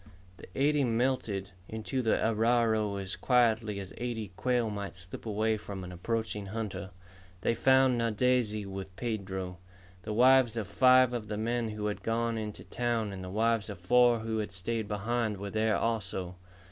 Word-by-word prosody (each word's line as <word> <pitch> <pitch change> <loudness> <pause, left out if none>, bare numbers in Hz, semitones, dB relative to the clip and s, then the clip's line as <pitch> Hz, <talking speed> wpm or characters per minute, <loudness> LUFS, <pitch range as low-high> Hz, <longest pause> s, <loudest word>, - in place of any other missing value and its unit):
The - - -12
eighty 145 +1 +3
melted 115 -5 0 0.2
into 110 +4 -3
the 110 -2 +2
arroyo 110 -2 +2
as 95 -1 -4
quietly 115 -4 +2
as 95 -1 -8
eighty 115 -4 -3
quail 120 -2 0
might 100 -1 -5
slip 90 +5 -8
away 110 +1 +1
from 100 -2 -7
an 90 - -7
approaching 105 +2 -3
hunter. 105 -2 -4 0.5
They 115 - +2
found 130 +1 +4
Nadeze 115 -2 +1
with 95 -1 -7
Pedro. 95 -5 -4 0.4
The 105 +3 -4
wives 125 0 +5
of 110 -4 -2
five 130 +3 +5
of 115 -3 -3
the 105 0 -3
men 115 +1 -1
who 105 -1 -4
had 105 0 -2
gone 115 +1 0
into 105 -1 -6
town 120 -3 -1
and 95 -1 -7
the 90 - -6
wives 110 +2 +1
of 100 - -6
four 120 +5 +4
who 110 0 -2
had 105 -1 -3
stayed 110 +4 -3
behind 110 +1 -1
were 100 +1 -6
there 110 0 +2
also. 95 -5 -2
110 Hz, 170 wpm, -30 LUFS, 100-120 Hz, 0.5 s, wives